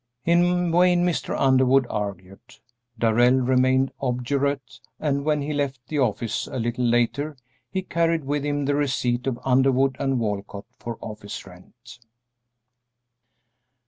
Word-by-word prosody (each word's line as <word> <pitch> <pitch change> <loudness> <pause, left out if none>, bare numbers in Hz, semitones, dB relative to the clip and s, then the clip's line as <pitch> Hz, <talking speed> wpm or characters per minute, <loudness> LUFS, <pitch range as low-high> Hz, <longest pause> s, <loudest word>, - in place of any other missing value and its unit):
In 175 +1 +3
vain 175 +1 +4
Mr. 175 -2 -1
Underwood 130 0 +4
argued; 100 -3 -6 0.4
Darrell 120 +3 +4
remained 130 +1 +2
obdurate, 130 0 -2 0.2
and 140 -2 0
when 150 -2 +1
he 150 +1 -3
left 140 -2 -2
the 150 - -1
office 115 -3 -1
a - - -6
little 120 +1 -1
later 120 +5 0 0.3
he 190 -1 -3
carried 165 -2 0
with 145 +1 -2
him 145 -1 -1
the 145 - +1
receipt 130 -3 0
of 125 -3 -1
Underwood 135 0 +3
& - - -24 0.2
Walcott 100 -2 -4
for 115 -1 -6
office 105 -2 -7
rent. 115 +8 -15
130 Hz, 130 wpm, -24 LUFS, 120-145 Hz, 0.4 s, vain